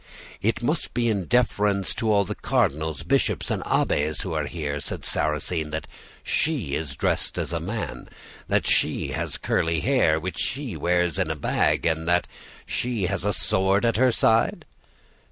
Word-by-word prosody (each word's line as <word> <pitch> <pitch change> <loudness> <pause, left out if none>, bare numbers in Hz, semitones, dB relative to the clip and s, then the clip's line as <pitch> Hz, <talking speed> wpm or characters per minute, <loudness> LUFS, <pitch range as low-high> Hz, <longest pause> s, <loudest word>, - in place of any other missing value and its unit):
"'It 115 +4 0
must 150 +7 -1
be 120 -1 +2
in 100 -5 0
deference 105 -5 +1
to 110 -1 0
all 100 -1 +3
the 105 - -3
cardinals, 80 -5 0
bishops, 135 +11 +1
and - - -1
abbes 75 +1 +1
who 95 -5 -4
are 75 -2 -1
here,' 75 -3 -3
said - - -5
Sarrasine, 75 +1 -1
'that 80 +1 -4 0.4
she 130 - 0
is 75 -3 -3
dressed - - 0
as - - -2
a 85 - 0
man, 100 +6 -5 0.4
that - - +1
she - - +1
has - - -3
curly 80 -1 0
hair 115 - +3
which 95 +3 -5
she 130 - -1
wears 85 0 +1
in - - +1
a 80 - -1
bag, 75 - +1
and 80 0 0
that 90 0 +3 0.4
she 120 -6 -1
has 100 +2 -1
a 105 - +1
sword 95 +2 +1
at 115 -2 +2
her 130 +1 +4
side? 115 0 +2
95 Hz, 170 wpm, -25 LUFS, 80-115 Hz, 0.4 s, her